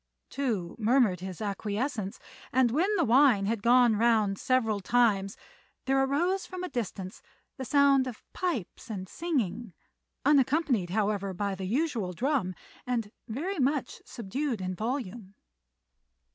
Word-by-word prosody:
Tou 220 -11 -2
murmured 225 -5 +3
his 185 0 -7
acquiescence; 210 +1 -3 0.3
and 255 -2 +3
when 330 - +2
the 350 - +2
wine 245 -5 +5
had 220 +1 -1
gone 240 0 +5
round 215 -3 +2
several 225 -5 +1
times 200 -2 +2 0.5
there 270 0 +3
arose 345 +8 +1
from 370 -1 -6
a 365 - -3
distance 195 - -5 0.4
the 265 - -5
sound 275 -1 +4
of 240 -3 -8
pipes 280 - -3
and 190 -4 -5
singing, 235 - -2 0.5
unaccompanied, 270 - +3
however, 200 -1 -1
by 200 +1 -1
the 190 0 -5
usual 230 - -1
drum, 235 - 0 0.3
and 230 -4 -1 0.2
very 320 - -3
much 275 +1 0
subdued 240 +3 -3
in 185 0 -3
volume. 220 -2 -4
235 Hz, 130 wpm, -29 LUFS, 200-275 Hz, 0.5 s, wine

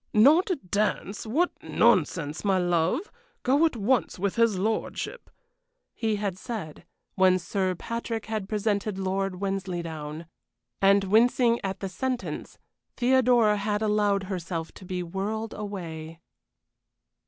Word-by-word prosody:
"Not 305 - +6 0.2
dance! 210 0 -1
What 320 +11 +2
nonsense, 150 -2 +2
my 195 -2 +3
love! 175 - +1 0.3
Go 280 +6 +4
at 315 - -6
once 230 +4 +1
with 195 +1 -1
his 230 -4 +3
lordship," 220 - -3 0.6
he 220 -2 0
had 200 -3 -3
said, 195 -11 -6 0.3
when 185 -1 +4
Sir 185 +2 -1
Patrick 230 +3 -4
had 215 -3 -4
presented 210 -1 -1
Lord 190 -1 -1
Wensleydown. 170 -5 -4 0.6
And 195 0 +5
wincing 235 +4 +4
at 195 -1 -3
the 195 - -2
sentence, 255 +5 -4 0.4
Theodora 245 -4 +4
had 210 +1 -1
allowed 205 -2 +2
herself 175 -3 -4
to 190 - -13
be 180 0 -3
whirled 205 +5 -3
away. 165 -6 -6
200 Hz, 120 wpm, -27 LUFS, 185-225 Hz, 0.6 s, Not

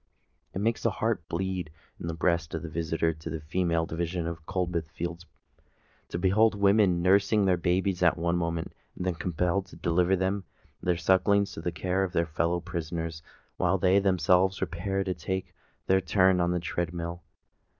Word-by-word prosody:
It 95 - -2
makes 115 +2 0
the 115 - +2
heart 110 -4 -2
bleed 90 -1 -2 0.3
in - - -5
the 85 - -3
breast 85 -1 0
of - - -4
the 85 - -5
visitor 80 0 0
to 80 +1 -8
the 80 0 -4
female 85 +1 0
division 85 +1 -3
of 80 -2 -6
Coldbath 90 -4 -2
Fields, 85 +1 -6 0.8
to - - -3
behold 100 +5 +3
women 100 -3 +3
nursing 100 +2 +4
their 95 -1 +4
babes 90 +2 0
at 90 -2 +4
one 85 +1 0
moment, 85 -1 -2 0.2
and 90 - -4
then 90 - +1
compelled 90 +3 -1
to - - -14
deliver 90 +2 +2
their 95 -2 -3
sucklings 100 +4 +3
to - - -7
the 85 - -2
care 90 +2 -1
of 95 -1 -3
their 85 - +2
fellow 85 +2 0
prisoners, 85 -2 -4 0.4
while - - +2
they 95 +2 +4
themselves 95 0 +3
repair 95 +2 -2
to 95 -1 -1
take 95 +2 -4 0.3
their 95 0 +3
turn 95 -1 +3
upon 85 0 +2
the 90 0 0
tread 85 0 -3
mill! 85 +1 -4
90 Hz, 180 wpm, -28 LUFS, 85-95 Hz, 0.8 s, nursing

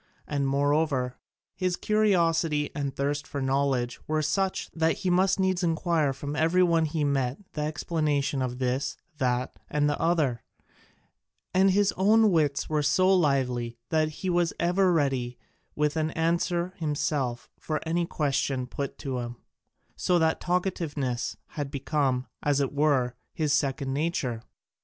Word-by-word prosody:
And 140 -2 -1
moreover, 140 -2 +1 0.3
his 185 -1 -1
curiosity 170 -9 +2
and 140 -2 -3
thirst 145 +1 -1
for 140 - -4
knowledge 135 -2 0
were 155 0 0
such 190 +5 -1
that 160 0 +1
he 180 - +3
must 190 +2 +3
needs 190 -1 +1
inquire 165 -3 +1
from 140 +2 -5
every 165 +4 +3
one 165 -2 +3
he 155 0 -1
met 135 -2 0 0.2
the 150 - -3
explanation 150 -2 -1
of 125 -1 -2
this, 130 +2 -1 0.2
that, 125 -1 -1
and 150 0 +1
the 145 - -1
other; 155 -8 +1 1.1
and 190 +1 +5
his 200 +1 +3
own 215 +3 +5
wits 150 -4 +1
were 155 -1 +1
so 185 +7 +3
lively 125 -7 +1
that 155 -1 +2
he 190 - 0
was 175 -1 +1
ever 180 +2 +3
ready 135 -6 0 0.4
with 150 0 +1
an 155 -1 0
answer 170 +2 0
himself 145 -5 -1
for 155 -1 -2
any 170 +1 0
question 135 -4 0
put 140 +2 -5
to 135 -4 -3
him, 120 0 -5 0.6
so 180 - +2
that 160 -1 +1
talkativeness 160 -9 -1
had 145 -2 -4
become, 135 -2 0 0.2
as 145 -1 +2
it 140 -1 0
were, 140 -4 +2 0.2
his 150 -3 +1
second 140 -2 0
nature. 140 -6 -1
150 Hz, 145 wpm, -27 LUFS, 135-170 Hz, 1.1 s, and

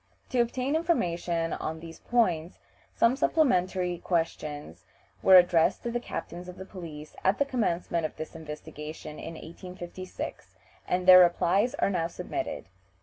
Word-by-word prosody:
To 250 -2 +2
obtain 255 +4 -1
information 175 - 0
on 160 +1 -4
these 165 0 -10
points 180 -8 +1 0.4
some 230 +2 +4
supplementary 185 - +1
questions 155 -4 -3 0.4
were 190 - +7
addressed 175 -2 +5
to 235 - -2
the 240 - -1
captains 180 -6 -6
of 180 - -10
police 155 -6 -9
at 190 +2 +3
the 285 - +2
commencement 175 - -1
of - - -19
this 155 - -7
investigation 150 -1 -8
in 165 - -7
1856, 180 +2 -8 0.3
and 180 0 0
their 185 0 +11
replies 180 +6 +3
are - - +1
now 165 -3 0
submitted. 180 - -5
180 Hz, 140 wpm, -28 LUFS, 165-210 Hz, 0.4 s, their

